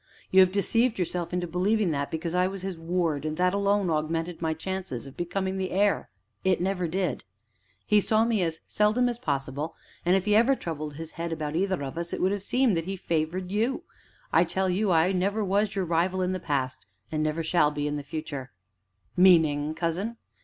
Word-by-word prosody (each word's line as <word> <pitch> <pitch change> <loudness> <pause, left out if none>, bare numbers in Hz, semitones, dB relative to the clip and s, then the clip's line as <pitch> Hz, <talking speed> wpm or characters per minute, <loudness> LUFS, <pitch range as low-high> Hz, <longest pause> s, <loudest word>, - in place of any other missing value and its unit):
You 190 - +6
have 185 -1 +7
deceived 225 +4 +1
yourself 175 -1 -2
into 180 0 -1
believing 185 +3 +1
that 140 -1 -2
because 165 +1 -3
I 180 0 +3
was 190 -1 -6
his 190 -1 -3
ward 165 -3 -1
that 180 +2 +2
alone 200 -2 +2
augmented 165 +2 -2
my 160 -1 0
chances 185 -7 -4
of 135 - -11
becoming 190 +2 -2
the 185 -1 -1
heir; 200 +2 +1 0.3
it 190 -2 +2
never 180 -1 0
did. 180 -4 -1 0.6
He 210 -1 +4
saw 220 +2 +3
me 230 -4 +1
as 165 -2 -2
seldom 215 +4 +2
as 240 -1 -3
possible, 140 - -3 0.3
and, 180 +2 +4
if 190 0 +1
he 210 0 +3
ever 235 +5 +5
troubled 155 - -5
his 160 +1 -7
head 170 0 -4
about 155 -1 -3
either 185 -3 0
of 140 +4 -5
us, 170 0 -3
it - - -2
would 195 +2 +1
seem 245 +3 +2
that 165 -2 -1
he 195 +1 -3
favored 175 +1 -2
you. 235 - 0 0.5
I - - +6
tell 190 -1 0
you 200 +3 +1
I 165 +2 +4
never 200 +3 0
was 200 +2 +1
your 190 -2 0
rival 175 +3 +1
in 180 - 0
the 185 - -2
past, 130 -7 -2 0.2
and 155 -1 -1
never 155 +2 0
shall 160 -2 +3
be 150 -1 -3
in 145 - -2
the 145 - -3
future." 145 -2 -6 0.7
"Meaning, 155 -5 +4
cousin?" 185 +8 -2
180 Hz, 205 wpm, -27 LUFS, 160-195 Hz, 0.7 s, have